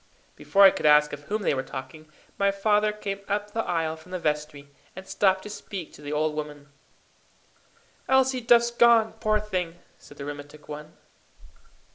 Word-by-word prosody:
Before 200 0 +3
I 195 - +9
could - - -1
ask 150 0 +5
of 145 0 -8
whom 210 +4 -3
they - - +2
were 130 - -1
talking, 155 +4 -9 0.3
my 200 0 +3
father 210 +1 +2
came 200 -2 -5
up 205 +1 -2
the 225 +1 -2
aisle 165 -2 -1
from 160 +3 -17
the 185 - -2
vestry, 150 -3 -3 0.3
and 190 +1 -10
stopped 190 -1 +1
to - - -8
speak 195 -5 -8
to - - -14
the 145 0 -6
old 150 +1 0
women. 150 -1 -7 1.4
"Elsie 265 -1 +3
Duff's 235 0 +4
gone, 235 -2 +4
poor 215 -1 +1
thing!" 185 -5 -3 0.2
said 145 - -16
the 140 - -7
rheumatic 145 +1 -9
one. 150 +1 -9
180 Hz, 175 wpm, -26 LUFS, 150-210 Hz, 1.4 s, I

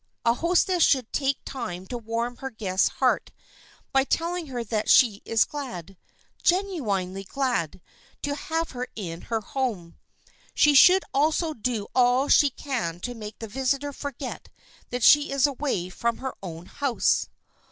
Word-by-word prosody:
A 230 - +5
hostess 350 +5 +1
should 260 -6 +3
take 275 -1 +1
time 205 -9 -5
to 245 - -5
warm 230 +2 -3
her 265 - -5
guest's 195 -6 0
heart - - 0 0.6
by 270 0 +4
telling 335 +3 -1
her 245 -3 -4
that 215 -1 -2
she 220 -5 +5
is 225 -1 +3
glad, 195 - -7 0.5
genuinely 215 - 0
glad, 235 - -2 0.4
to 285 - -1
have 325 +2 -3
her 250 0 -5
in 170 -5 -6
her 225 -2 0
home. 210 -8 -4 0.6
She 295 - +5
should 365 +7 +7
also 310 +3 +1
do 230 -4 -2
all 250 +2 +3
she 290 - +6
can 240 - -4
to 245 - -4
make 215 -2 -8
the 225 - -7
visitor 270 +5 -1
forget 280 -2 -6 0.4
that 245 -1 -3
she 295 +4 +6
is 275 -1 +3
away 270 -10 -1
from 235 +5 -2
her 265 0 -5
own 170 -3 -8
house. 275 +2 0
250 Hz, 150 wpm, -25 LUFS, 215-285 Hz, 0.6 s, should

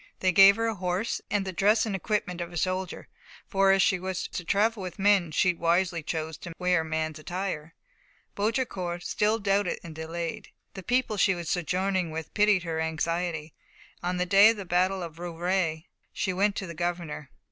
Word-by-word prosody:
They 185 - +2
gave 195 +1 +8
her 225 +1 -1
a 225 - 0
horse, 185 +3 -2
and 205 -1 0
the 190 - -4
dress 210 +5 +3
and 210 -3 -2
equipment 190 -2 -2
of 170 0 -5
a 175 - -6
soldier; 185 +2 -2 0.4
for 195 -1 +3
as 195 0 +4
she 190 -1 +2
was 185 0 -3
to 180 - -5
travel 210 +4 +1
with 185 -1 -6
men, 200 -3 +3
she 175 +3 +2
wisely 170 +1 +1
chose 160 0 -4
to 170 -2 -9
wear 180 -2 +2
man's 160 0 -3
attire. 170 -2 -4 0.6
Baudricourt 200 -6 -2
still 215 +1 +1
doubted 200 -3 0
and 165 - -8
delayed. 165 +1 -5 0.3
The 190 - -7
people 245 +1 0
she 195 -1 +3
was 170 -1 -4
sojourning 185 +1 0
with 160 0 -6
pitied 210 -3 +3
her 165 -2 -3
anxiety. 160 0 -2 0.5
On 180 +1 -2
the 180 - 0
day 200 +3 +7
of 225 - 0
the 200 - -6
battle 185 +2 +1
of 165 -1 -8
Rouvray 175 -1 -1 0.3
she 185 - -2
went 200 +2 +1
to 195 - -3
the 170 - -7
governor. 170 -4 -4
180 Hz, 190 wpm, -27 LUFS, 170-195 Hz, 0.6 s, gave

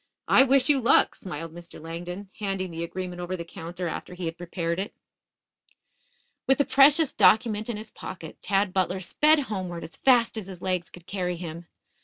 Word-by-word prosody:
I - - +6
wish 265 -1 +4
you 290 -2 +4
luck," 235 - +4
smiled 165 -2 -7
Mr. 170 0 -11
Langdon, 175 +4 -7
handing 195 -3 -2
the 165 0 -4
agreement 180 +1 -5
over 180 +1 -4
the 170 - -6
counter 170 +2 -6
after 180 - -6
he 180 -1 -5
had 165 0 -3
prepared 170 0 -3
it. 200 - -5 1.5
With 270 - +4
the 285 - +2
precious 280 +3 +6
document 220 -1 +3
in 230 - -2
his 215 - -8
pocket, - - -9
Tad 195 -1 +1
Butler 185 0 0
sped 300 - +3
homeward 185 -8 -5
as 160 - -7
fast 240 -4 +3
as 200 - -9
his 185 -3 -9
legs 180 -1 -2
could 175 -1 -14
carry 180 -2 -2
him. 170 0 -7
185 Hz, 185 wpm, -26 LUFS, 170-220 Hz, 1.5 s, I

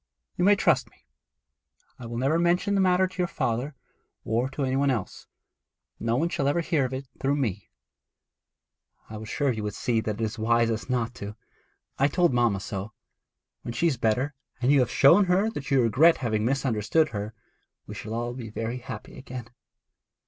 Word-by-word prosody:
'You - - -1
may 205 +2 +6
trust - - +2
me. 65 - -29 0.9
I 120 - -7
will 115 0 -5
never 140 +7 +2
mention 175 +4 +2
the 195 - +3
matter 185 0 +4
to 185 - -8
your 180 - +2
father, 125 +1 -2 0.5
or 120 +4 0
to 140 +1 -4
any 130 0 0
one 140 +1 +2
else. 115 -8 -3 0.7
No 115 +1 0
one 155 +7 +1
shall 140 -5 -1
ever 145 +4 +2
hear 155 -4 +1
of 130 - -4
it 135 +1 -6
through 140 +1 +1
me.' 105 -9 -2 1.4
'I 110 - -6
was 110 0 -8
sure 140 -2 +1
that 115 - -4
you - - -2
would 105 -1 -4
see 115 -2 0
that 110 -1 -4
it - - -1
is 110 +1 -3
wisest 115 +1 +1
not 120 -2 -1
to; 105 -4 -7 0.6
I 140 - +5
told 175 +1 +2
mamma 120 -5 +2
so. 100 +2 -5 0.7
When 120 - -6
she 165 - 0
is 155 -7 +2
better, 120 +6 0 0.3
and 125 +2 +2
you 145 - +5
have 125 -2 +2
shown 165 +12 +6
her 190 +5 +2
that 145 -10 -6
you 135 -3 +4
regret 150 +9 +5
having 110 -4 -1
misunderstood 135 +3 +1
her, 105 0 -5 0.5
we - - -8
shall 110 +1 -6
all 120 +1 -2
be 120 -3 -7
very 115 +3 -4
happy 120 -3 -9
again.' 125 -3 -8
125 Hz, 195 wpm, -26 LUFS, 115-145 Hz, 1.4 s, may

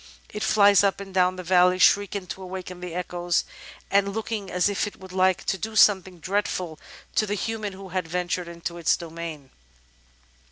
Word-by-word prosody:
It 210 - -5
flies 205 -2 +5
up 195 -1 +1
and 195 -1 -9
down 185 0 +3
the 185 - -7
valley, 180 +1 +4
shrieking 200 +1 +3
to 190 - -7
awaken 185 -1 -7
the 180 -2 -6
echoes, 175 -1 -1 0.5
and 200 0 +3
looking 220 -3 -3
as 180 +1 +2
if 205 0 0
it 205 - -10
would 190 0 -11
like 185 0 +2
to 190 - -1
do 220 +3 -5
something 190 -4 +4
dreadful 185 -3 -2 0.3
to 215 - +1
the 205 - -1
human 215 -1 -3
who 190 0 -10
had 180 -2 -2
ventured 180 +1 -2
into 170 0 -6
its 165 - +2
domain. 165 -4 -8
185 Hz, 185 wpm, -25 LUFS, 175-200 Hz, 0.5 s, flies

